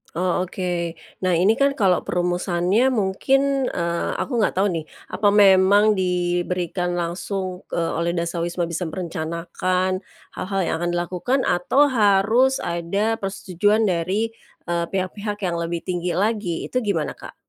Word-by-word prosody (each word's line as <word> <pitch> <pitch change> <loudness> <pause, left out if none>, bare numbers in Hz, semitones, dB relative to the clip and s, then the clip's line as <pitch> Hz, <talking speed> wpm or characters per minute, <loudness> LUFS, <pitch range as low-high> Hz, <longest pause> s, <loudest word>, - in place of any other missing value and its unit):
Oh, 180 +1 0
oke. 175 -2 -3 0.2
Nah, 185 -2 +1
ini 210 - +3
kan 275 0 +3
kalau 190 -7 +3
perumusannya 180 +5 +1
mungkin, 265 +5 +1
eee, 170 -1 -2
aku 245 -3 -2
nggak 210 - +1
tahu 195 0 +2
nih, 160 -2 -3 0.3
apa 205 - +1
memang 200 +1 +5
diberikan 175 0 -1
langsung, 180 +2 -4
eee, 165 -1 0
oleh 170 +1 0
dasawisma 170 +1 -2
bisa 170 +1 -3
merencanakan, 180 +2 -2 0.3
hal-hal 195 +1 -3
yang - - -1
akan 175 0 -1
dilakukan? 180 +10 -1
Atau, 265 +11 +3
harus 220 +4 +3
ada 200 +7 -1
persetujuan 200 +2 0
dari, 190 +4 0 0.3
eee, 170 0 -1
pihak-pihak 200 +3 -4
yang 175 -2 -1
lebih 170 0 -3
tinggi 175 -1 -2
lagi, 200 -3 -1
itu 255 - +1
gimana 200 -10 -1
Kak? - - -11
185 Hz, 135 wpm, -22 LUFS, 175-205 Hz, 0.3 s, memang